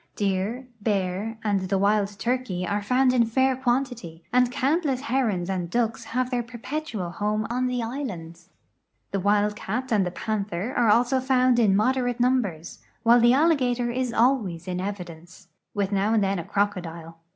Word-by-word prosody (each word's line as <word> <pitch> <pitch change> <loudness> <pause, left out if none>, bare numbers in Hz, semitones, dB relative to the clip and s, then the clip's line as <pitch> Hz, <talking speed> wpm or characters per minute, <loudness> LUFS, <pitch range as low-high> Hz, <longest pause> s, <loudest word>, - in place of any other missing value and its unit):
Deer, 205 +6 -1
bear, 200 +1 -1
and 195 -3 0
the 195 - +2
wild 200 +1 +2
turke}^ 205 -3 -2
are 205 0 -1
found 255 +4 +2
in 245 -2 +4
fair 260 +3 +2
quantity, 245 -10 -2
and 250 0 +4
countless 275 0 0
herons 230 -10 0
and 185 -3 -2
ducks 230 +2 -1
have 255 +1 -2
their 245 -1 0
perpetual 235 - -5
home 210 +3 -1
on 255 +1 0
the 250 -1 -1
islands. 185 - -6 0.6
The 195 - -1
wild 205 +2 +2
cat 245 +6 -4
and 210 -3 +3
the 180 - -1
panther 205 +3 -3
also 240 +3 +3
are - - 0
found 255 -2 +3
in 205 -4 +4
moderate 245 +3 +1
numbers, 240 -10 0 0.2
while 235 +1 +6
the 240 +1 +5
alligator 255 -5 +2
is 255 0 -1
always 220 -9 +1
in 180 0 -2
evidence, 180 -2 -8 0.3
with 200 -1 -1
now 200 +3 +1
and 215 - +3
then 195 -1 0
a 165 - -6
crocodile. 170 -5 -3
220 Hz, 165 wpm, -25 LUFS, 195-250 Hz, 0.6 s, while